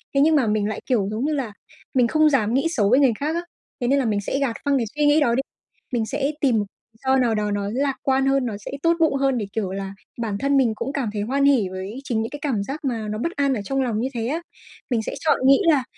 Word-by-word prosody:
Thế 275 - +5
nhưng 315 +2 +5
mà 265 -6 +3
mình 210 -1 +1
lại, 215 - -4
kiểu, 225 -7 +1
giống 220 +5 -2
như 305 - 0
là 260 -8 -3 0.4
mình 250 -2 +4
không 310 +4 +4
dám 230 -6 +1
nghĩ 275 +6 +2
xấu 215 -11 +1
với 255 +4 +5
người 270 -4 +5
khác 305 +3 -1
á, 340 - 0 0.4
thế 245 - 0
nên 280 +2 +3
là 265 - 0
mình 210 -2 0
sẽ 265 +7 -2
gạt 265 -5 0
phăng 285 -1 +3
cái 240 - 0
suy 295 0 +2
nghĩ 290 +1 +5
đó 240 -6 +2
đi, 265 - +2 0.5
mình 230 -2 +1
sẽ 275 +4 -1
tìm 260 -5 +3
m - - +3 0.3
lý - - -26
do 265 0 +4
nào 235 -3 +2
đó 210 -1 -1
nó 205 0 -1
lạc 275 +1 0
quan 265 0 +2
hơn, 270 -1 +2
nó 220 -4 -3
sẽ - - -5
tốt 335 0 +4
bụng 320 -4 +3
hơn 270 -1 +1
để, 215 - -2
kiểu 205 -4 -2
là, 195 0 -5 0.3
bản 210 -3 -2
thân 275 +4 +1
mình 245 -5 +3
cũng 270 +5 -4
cảm 270 -6 -1
thấy 210 - -2
hoan 270 +6 0
hỉ 255 -9 +3
với 190 +6 -6
chính 235 -5 -1
những 225 - -3
cái 290 - -6
cảm 250 -9 -1
giác 280 +7 -6
mà 230 -5 -2
nó 210 0 -3
bất 330 +10 -2
an 280 -1 +2
ở 225 - -2
trong 270 +7 -1
lòng 235 -5 -1
như 245 - 0
thế 230 -2 -2
á. 315 +6 -2 0.5
Mình 240 -4 +1
sẽ - - -4
chọn 315 - +2
nghĩ 275 0 +7
là, 280 -4 +2
255 Hz, 295 wpm, -23 LUFS, 220-280 Hz, 0.5 s, nghĩ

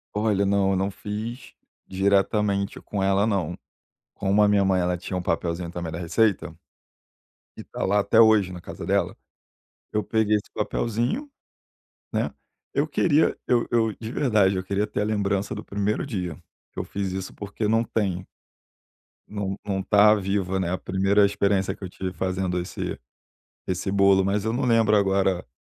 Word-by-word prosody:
Olha, 105 -2 +1
não, 100 -1 +2
eu - - +1
não 95 +1 0
fiz 110 +6 -6 0.3
diretamente 100 +1 +1
com 100 -2 -4
ela 100 +1 +3
não. 90 -6 -1 0.6
Como 100 +1 +1
a - - +6
minha 100 -1 +3
mãe 95 -1 +2
ela 90 0 0
tinha 95 +1 -5
um 90 - -2
papelzinho 85 0 -2
também 85 -2 -4
da 80 - -5
receita, 90 +1 +1 1.0
e - - -6
está - - -6
lá 100 +2 +2
até 110 +2 +3
hoje 110 -4 +5
na 90 - -8
casa - - -8
dela, - - 0 0.8
eu 105 -1 +1
peguei 110 -1 +2
esse 105 - -4
papelzinho, 120 - -2 0.8
né, - - -1 0.4
eu - - +1
queria, 155 -2 +2
eu 120 -2 +2
eu, 115 -2 +2
de 110 +2 -7
verdade, 105 -8 +2
eu 95 - -2
queria 100 +3 -1
ter - - -2
a - - +1
lembrança 100 -2 -1
do - - -6
primeiro 100 +1 -1
dia. 90 - -4 0.4
Eu - - -3
fiz 100 -1 -4
isso, 95 0 -5
porque 105 +1 -4
não 115 +2 +3
tenho. 95 -5 -2 1.0
Não 100 -2 -4
não 100 -1 -1
está 105 +2 +5
viva, 95 -1 -1
né, 95 -2 -1
a 95 - 0
primeira 95 +3 +2
experiência 100 -1 +1
que - - -14
eu 95 - -5
tive 95 0 -5
fazendo 95 -1 -1
esse 90 - -5 0.7
esse 95 +1 -2
bolo, 100 -1 +4
mas 100 +1 0
eu 110 - 0
não 120 - -1
lembro 115 -3 +4
agora 95 -2 +1
100 Hz, 170 wpm, -25 LUFS, 95-105 Hz, 1.0 s, a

